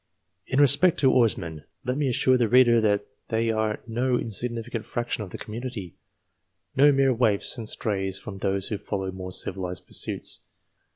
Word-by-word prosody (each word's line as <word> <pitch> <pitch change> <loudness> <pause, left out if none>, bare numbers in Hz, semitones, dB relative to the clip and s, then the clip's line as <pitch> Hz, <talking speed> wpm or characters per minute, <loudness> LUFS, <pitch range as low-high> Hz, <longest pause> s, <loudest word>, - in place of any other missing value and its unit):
In 130 - 0
respect 150 +5 +5
to 135 -2 +5
Oarsmen, 85 -10 +1 0.2
let 125 +1 -1
me 140 -1 0
assure 130 +1 +3
the 120 -2 +2
reader 120 -1 +5
that 105 -1 +1 0.2
they 115 0 0
are 110 -1 -1
no 120 +2 0
insignificant 115 +1 -3
fraction 120 -1 -3
of 100 - -9
the - - -7
community, 110 -5 -7 0.8
no 145 +2 +6
mere 135 -1 +3
waifs 110 -4 +3
and 110 -3 -6
strays 95 -3 -2
from 95 -1 -9
those 95 0 -1
who 105 -3 -3
follow 95 -2 -3
more 95 0 -7
civilized 90 -1 -3
pursuits. - - -2
115 Hz, 165 wpm, -25 LUFS, 100-125 Hz, 0.8 s, no